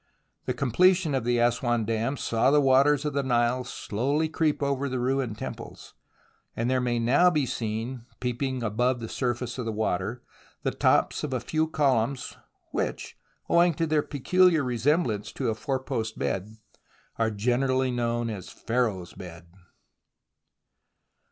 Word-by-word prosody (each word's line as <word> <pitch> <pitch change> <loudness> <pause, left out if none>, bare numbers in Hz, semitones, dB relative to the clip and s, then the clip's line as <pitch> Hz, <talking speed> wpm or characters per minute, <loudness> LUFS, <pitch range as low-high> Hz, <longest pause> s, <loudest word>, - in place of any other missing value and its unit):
The - - -2
completion 175 +5 +3
of 130 -4 -1
the 120 0 +2
Assouan 120 -1 +1
dam 115 +5 -1
saw 115 +1 +1
the 145 +1 +5
waters 140 +2 +4
of 150 - -1
the 140 - +1
Nile 125 -1 +1
slowly 135 +6 -1
creep 155 -2 0
over 140 0 0
the 130 0 -2
ruined 125 -3 -1
temples, - - -8 0.6
and 115 - -1
there 130 0 +1
may 120 -1 0
now 130 +10 +4
be 150 -5 +1
seen 115 +1 -4
peeping 125 +1 -2
above 120 +3 +1
the 115 - -5
surface 120 0 -3
of 125 - -3
the 115 - -1
water 110 +2 -2 0.4
the - - 0
tops - - +2
of - - -3
a - - 0
few 160 0 -1
columns 135 -4 0 0.4
which, - - -3 0.3
owing 170 -1 +4
to 165 - 0
their 155 -1 +2
peculiar 165 +3 +3
resem 130 +7 +1
blance 105 -3 -3
to - - -1
a - - +1
fourpost 130 -3 -3
bed, 105 +4 -3 0.6
are 115 -1 +2
generally 130 +4 +1
known 120 -1 -1
as 95 -4 -7
Pharaoh's 110 -7 -2
Bed. 85 -2 -11
125 Hz, 150 wpm, -27 LUFS, 115-140 Hz, 0.6 s, the